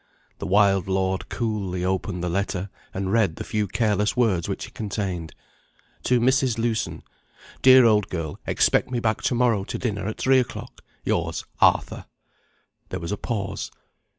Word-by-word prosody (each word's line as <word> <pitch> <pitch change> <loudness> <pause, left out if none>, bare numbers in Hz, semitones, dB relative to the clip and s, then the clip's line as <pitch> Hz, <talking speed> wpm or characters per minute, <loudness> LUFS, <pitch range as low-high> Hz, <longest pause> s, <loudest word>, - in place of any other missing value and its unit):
The 100 - -4
wild 100 -1 +3
lord 95 0 -1
coolly 100 -6 -2
opened 95 -1 -2
the - - 0
letter, 95 +1 -2 0.2
and 95 0 -3
read 110 -8 +3
the - - -6
few 105 -2 -1
careless 105 +1 +1
words 100 -9 +2
which - - -3
it - - -14
contained. 95 -6 -4 0.7
"To 125 -1 +3
Mrs. 130 -1 +2
Lewson: 115 -1 -1 0.6
Dear 130 -1 +8
old 105 -2 +3
girl, 80 -4 -4
expect - - +2
me 125 -1 -1
back 110 -2 0
to 125 - 0
morrow 120 -5 +2
to - - -4
dinner 100 -5 -2
at 110 - -4
three 130 0 +4
o'clock. 125 - -5 0.2
Yours, - - -1
ARTHUR." - - +2 0.8
There - - -4
was 85 +1 -5
a 105 - -1
pause. 100 -5 -3
105 Hz, 160 wpm, -24 LUFS, 95-115 Hz, 0.8 s, Dear